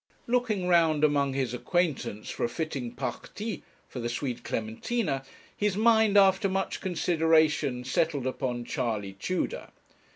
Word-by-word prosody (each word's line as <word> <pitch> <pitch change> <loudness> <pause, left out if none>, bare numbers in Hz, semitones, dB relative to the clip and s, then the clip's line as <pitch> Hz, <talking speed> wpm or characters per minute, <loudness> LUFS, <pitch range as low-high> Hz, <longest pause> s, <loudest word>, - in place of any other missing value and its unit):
Looking 235 -6 0
round 165 -4 +4
among 140 -2 +3
his 130 -3 -1
acquaintance 145 - -1
for - - -4
a 120 - +1
fitting 135 -4 -4
parti 215 - -5 0.3
for 125 - -7
the 120 0 -2
sweet 125 +1 -3
Clementina, 135 - -2 0.3
his 205 -2 0
mind, 220 -2 +4
after 195 0 +5
much 195 0 -2
consideration, 160 -7 +2
settled 150 0 0
upon 125 -2 -2
Charley 110 -7 -2
Tudor. 185 - -3
155 Hz, 130 wpm, -28 LUFS, 125-190 Hz, 0.3 s, after